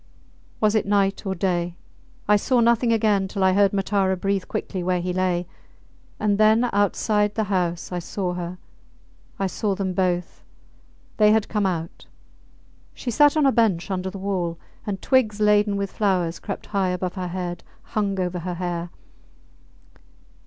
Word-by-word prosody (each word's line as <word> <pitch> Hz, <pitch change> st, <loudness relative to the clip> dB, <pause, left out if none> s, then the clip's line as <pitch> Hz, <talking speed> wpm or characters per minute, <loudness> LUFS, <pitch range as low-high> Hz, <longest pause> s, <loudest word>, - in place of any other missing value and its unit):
Was 215 Hz, -1 st, +3 dB
it 215 Hz, -3 st, +1 dB
night 200 Hz, 0 st, +1 dB
or 190 Hz, -, -1 dB
day? 175 Hz, -1 st, -1 dB, 0.5 s
I 210 Hz, -, +5 dB
saw 245 Hz, +4 st, +2 dB
nothing 235 Hz, 0 st, +3 dB
again 210 Hz, -3 st, +2 dB
till 195 Hz, 0 st, -2 dB
I 190 Hz, 0 st, +4 dB
heard 200 Hz, 0 st, +4 dB
Matara 195 Hz, -1 st, +1 dB
breathe 195 Hz, 0 st, -1 dB
quickly 185 Hz, -, -4 dB
where 180 Hz, 0 st, 0 dB
he 180 Hz, +1 st, -2 dB
lay, 180 Hz, -1 st, 0 dB, 0.7 s
and 205 Hz, -1 st, +1 dB
then 220 Hz, +3 st, +5 dB
outside 205 Hz, +1 st, +1 dB
the 220 Hz, -, +1 dB
house 175 Hz, -2 st, -1 dB
I 180 Hz, -, -2 dB
saw 180 Hz, +1 st, -3 dB
her. 175 Hz, 0 st, -5 dB, 0.8 s
I 195 Hz, -, -1 dB
saw 200 Hz, +1 st, -1 dB
them 190 Hz, -1 st, -2 dB
both. 180 Hz, -1 st, -1 dB, 0.8 s
They 210 Hz, -1 st, +5 dB
had 220 Hz, -1 st, +2 dB
come 210 Hz, -2 st, +1 dB
out. 165 Hz, -3 st, -4 dB, 0.9 s
She 245 Hz, -, -4 dB
sat 295 Hz, +4 st, +4 dB
on 300 Hz, -, +4 dB
a 270 Hz, -, +5 dB
bench 205 Hz, -6 st, +1 dB
under 190 Hz, 0 st, -2 dB
the 195 Hz, -, -8 dB
wall, 185 Hz, -4 st, -2 dB, 0.3 s
and 195 Hz, -2 st, -2 dB
twigs 225 Hz, -6 st, +2 dB
laden 210 Hz, -1 st, +3 dB
with 200 Hz, -1 st, -3 dB
flowers 180 Hz, -5 st, 0 dB
crept 200 Hz, -, -6 dB
high 195 Hz, -2 st, +2 dB
above 180 Hz, 0 st, -2 dB
her 185 Hz, -2 st, -4 dB
head, 175 Hz, -1 st, -4 dB, 0.2 s
hung 200 Hz, -3 st, -2 dB
over 180 Hz, -1 st, -1 dB
her 175 Hz, +1 st, -4 dB
hair. 175 Hz, -1 st, -3 dB
195 Hz, 165 wpm, -23 LUFS, 180-210 Hz, 0.9 s, I